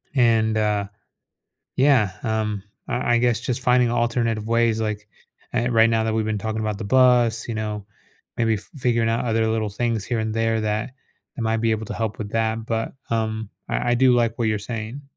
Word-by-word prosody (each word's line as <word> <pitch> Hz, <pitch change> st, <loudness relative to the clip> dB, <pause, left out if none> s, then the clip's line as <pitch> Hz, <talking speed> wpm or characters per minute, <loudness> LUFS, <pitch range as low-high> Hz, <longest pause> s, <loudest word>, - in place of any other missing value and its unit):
And, 110 Hz, -3 st, +3 dB
uh. 105 Hz, -2 st, +1 dB, 0.9 s
Yeah, 130 Hz, -8 st, +4 dB
um, 110 Hz, -2 st, -1 dB, 0.2 s
I 120 Hz, -1 st, 0 dB
I -, -, +3 dB
guess 120 Hz, -1 st, +2 dB
just 120 Hz, 0 st, -2 dB
finding 125 Hz, -2 st, +3 dB
alternative 115 Hz, -2 st, 0 dB
ways, 115 Hz, -1 st, +2 dB
like, 105 Hz, -1 st, -3 dB, 0.4 s
eh, 120 Hz, 0 st, 0 dB
right 115 Hz, -1 st, +5 dB
now 110 Hz, -1 st, +1 dB
that 110 Hz, 0 st, 0 dB
we've 110 Hz, -1 st, +1 dB
been 110 Hz, -1 st, -1 dB
talking 110 Hz, +1 st, -3 dB
about 105 Hz, -2 st, -2 dB
the 110 Hz, -, -5 dB
bus, 120 Hz, -1 st, +3 dB
you 115 Hz, -, -2 dB
know, 105 Hz, -1 st, -3 dB, 0.5 s
maybe 115 Hz, -1 st, +2 dB
f 105 Hz, -, -7 dB
figuring 120 Hz, -4 st, +1 dB
out 115 Hz, +2 st, 0 dB
other 115 Hz, -1 st, +1 dB
little 110 Hz, -1 st, 0 dB
things 110 Hz, 0 st, -1 dB
here 120 Hz, -2 st, -1 dB
and 110 Hz, 0 st, -2 dB
there 115 Hz, 0 st, +1 dB
that 110 Hz, +2 st, -1 dB, 0.5 s
I -, -, -5 dB
might 110 Hz, 0 st, +1 dB
be 115 Hz, 0 st, +1 dB
able 110 Hz, 0 st, -3 dB
to -, -, -5 dB
help 110 Hz, -2 st, -2 dB
with 105 Hz, -2 st, -5 dB
that 115 Hz, 0 st, -1 dB
but, 115 Hz, -1 st, -2 dB, 0.2 s
um, 110 Hz, -2 st, -2 dB, 0.2 s
I 120 Hz, -, 0 dB
I -, -, +4 dB
do 130 Hz, 0 st, +5 dB
like 115 Hz, -2 st, +1 dB
what 115 Hz, -, +1 dB
you're 110 Hz, -1 st, 0 dB
saying. 115 Hz, +5 st, -6 dB
115 Hz, 205 wpm, -23 LUFS, 110-120 Hz, 0.9 s, right